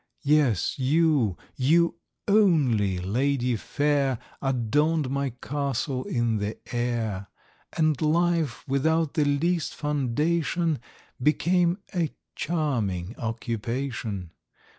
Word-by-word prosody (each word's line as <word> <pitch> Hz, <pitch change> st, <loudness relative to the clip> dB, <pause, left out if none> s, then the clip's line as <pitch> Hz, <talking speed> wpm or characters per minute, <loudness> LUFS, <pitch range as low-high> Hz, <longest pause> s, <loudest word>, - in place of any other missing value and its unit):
Yes, 140 Hz, -, +2 dB
you, 140 Hz, -, +2 dB, 0.2 s
you 165 Hz, +5 st, +3 dB, 0.3 s
only, 145 Hz, -, +3 dB
Lady 125 Hz, +6 st, 0 dB
Fair, 140 Hz, +1 st, 0 dB, 0.2 s
Adorn'd 135 Hz, +3 st, +1 dB
my 140 Hz, 0 st, 0 dB
Castle 135 Hz, 0 st, -3 dB
in 120 Hz, -2 st, 0 dB
the 105 Hz, +1 st, -3 dB, 0.2 s
Air; 115 Hz, -5 st, -1 dB, 0.5 s
And 155 Hz, -4 st, +2 dB
Life, 165 Hz, -3 st, +1 dB
without 155 Hz, +3 st, +1 dB
the 150 Hz, -, +2 dB
least 160 Hz, +3 st, 0 dB
foundation, 150 Hz, +3 st, 0 dB, 0.4 s
Became 170 Hz, +5 st, +2 dB, 0.2 s
a 170 Hz, -5 st, 0 dB, 0.2 s
charming 115 Hz, -, -1 dB
occupation. 115 Hz, -4 st, -3 dB
140 Hz, 90 wpm, -26 LUFS, 115-155 Hz, 0.5 s, you